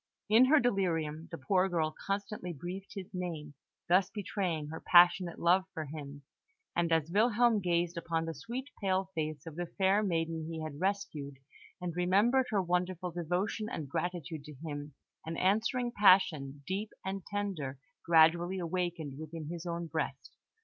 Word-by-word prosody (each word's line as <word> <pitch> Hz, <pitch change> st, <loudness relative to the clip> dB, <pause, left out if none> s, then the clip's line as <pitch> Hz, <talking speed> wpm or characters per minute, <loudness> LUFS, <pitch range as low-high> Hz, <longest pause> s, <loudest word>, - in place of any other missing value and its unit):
In 230 Hz, +4 st, +8 dB
her 300 Hz, +4 st, +6 dB
delirium, 165 Hz, -, 0 dB
the 165 Hz, -, -6 dB
poor 185 Hz, +7 st, +2 dB
girl 160 Hz, -3 st, 0 dB
constantly 200 Hz, -2 st, -3 dB
breathed 180 Hz, +7 st, -7 dB
his 195 Hz, -1 st, -7 dB
name, 165 Hz, -5 st, -4 dB, 0.3 s
thus 185 Hz, +2 st, +4 dB
betraying 185 Hz, -6 st, -2 dB
her 160 Hz, -, -6 dB
passionate 175 Hz, 0 st, +5 dB
love 180 Hz, +2 st, +3 dB
for 160 Hz, -, -3 dB
him; 145 Hz, -1 st, -8 dB, 0.5 s
and 170 Hz, -1 st, +1 dB
as 160 Hz, 0 st, +2 dB
Wilhelm 230 Hz, +2 st, +4 dB
gazed 175 Hz, -2 st, 0 dB
upon 165 Hz, -1 st, -1 dB
the 165 Hz, -, -3 dB
sweet, 240 Hz, -, -6 dB
pale 190 Hz, -1 st, 0 dB
face 155 Hz, -3 st, -3 dB
of 165 Hz, -2 st, -8 dB
the 175 Hz, +1 st, -3 dB
fair 195 Hz, +3 st, +2 dB
maiden 165 Hz, -4 st, -1 dB
he 160 Hz, -1 st, -4 dB
had 155 Hz, 0 st, -6 dB
rescued, 170 Hz, -8 st, -2 dB, 0.4 s
and 175 Hz, -2 st, -4 dB
remembered 205 Hz, +9 st, +3 dB
her 200 Hz, -3 st, +1 dB
wonderful 180 Hz, 0 st, -1 dB
devotion 180 Hz, +6 st, -2 dB
and 155 Hz, -, -5 dB
gratitude 165 Hz, -2 st, -3 dB
to 150 Hz, -1 st, -10 dB
him, 145 Hz, -1 st, -6 dB, 0.3 s
an 165 Hz, +1 st, -5 dB
answering 230 Hz, +6 st, +1 dB
passion, 160 Hz, -, +4 dB
deep 200 Hz, +5 st, -2 dB, 0.2 s
and 190 Hz, 0 st, -3 dB
tender, 190 Hz, -10 st, -3 dB, 0.3 s
gradually 170 Hz, +3 st, +4 dB
awakened 170 Hz, -5 st, -3 dB
within 155 Hz, 0 st, -7 dB
his 170 Hz, +1 st, -6 dB
own 170 Hz, 0 st, -3 dB
breast. 165 Hz, -, -4 dB
175 Hz, 155 wpm, -32 LUFS, 160-195 Hz, 0.5 s, In